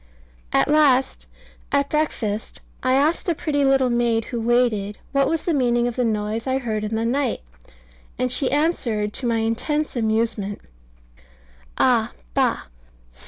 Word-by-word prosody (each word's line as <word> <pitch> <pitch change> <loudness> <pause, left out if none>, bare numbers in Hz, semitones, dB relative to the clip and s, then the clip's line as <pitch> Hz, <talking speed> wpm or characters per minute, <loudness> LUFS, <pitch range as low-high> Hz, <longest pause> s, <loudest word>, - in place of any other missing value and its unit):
At - - +3
last 285 -4 +3 0.4
at 280 0 +1
breakfast 225 -9 -2 0.2
I 255 - +2
asked 300 +7 +1
the 340 - +1
pretty 290 -2 0
little 270 -2 +3
maid 235 -2 +1
who 235 -2 -4
waited 225 -4 +1
what 275 -1 +2
was 325 -1 -1
the 340 - 0
meaning 240 -3 +2
of 240 - -3
the 250 - 0
noise 220 +1 -2
I 260 0 +1
heard 220 -5 -3
in 215 +1 -2
the 225 +1 -1
night, 260 +2 0 0.8
and 255 -1 -1
she 260 +1 0
answered, 240 -9 0
to 250 - -3
my 230 -1 +1
intense 250 +8 -1
amusement, 220 -3 -1 1.2
"Ah! - - +2 0.2
bah! - - +1
245 Hz, 150 wpm, -22 LUFS, 225-280 Hz, 1.2 s, At